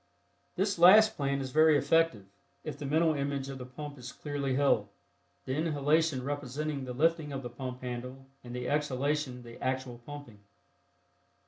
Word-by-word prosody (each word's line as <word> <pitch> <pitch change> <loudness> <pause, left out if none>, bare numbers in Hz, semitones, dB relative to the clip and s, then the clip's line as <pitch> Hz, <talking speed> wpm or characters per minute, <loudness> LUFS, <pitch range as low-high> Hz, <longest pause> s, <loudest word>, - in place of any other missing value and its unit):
This 195 -1 0
last 215 +5 +8
plan 140 -1 -1
is 130 -1 -5
very 155 0 +5
effective 165 -10 +2 0.4
if 155 - -5
the 145 - -6
mental 160 +2 +3
image 140 -1 -2
of 135 -1 -6
the 125 - -7
pump 145 +2 -8
is 125 0 -7
clearly 140 -3 -3
held, 130 -7 +2 0.6
the 130 - -2
inhalation 150 -1 +1
representing 145 +1 -3
the 125 - -5
lifting 160 +2 +1
of 135 -1 -5
the 120 - -6
pump 125 +1 -6
handle 125 +2 -6 0.2
and 120 0 -8
the 125 0 -4
exhalation 145 -2 -1
the 120 0 -11
actual 130 -2 -2
pumping. 125 -4 -10
140 Hz, 160 wpm, -30 LUFS, 125-150 Hz, 0.6 s, last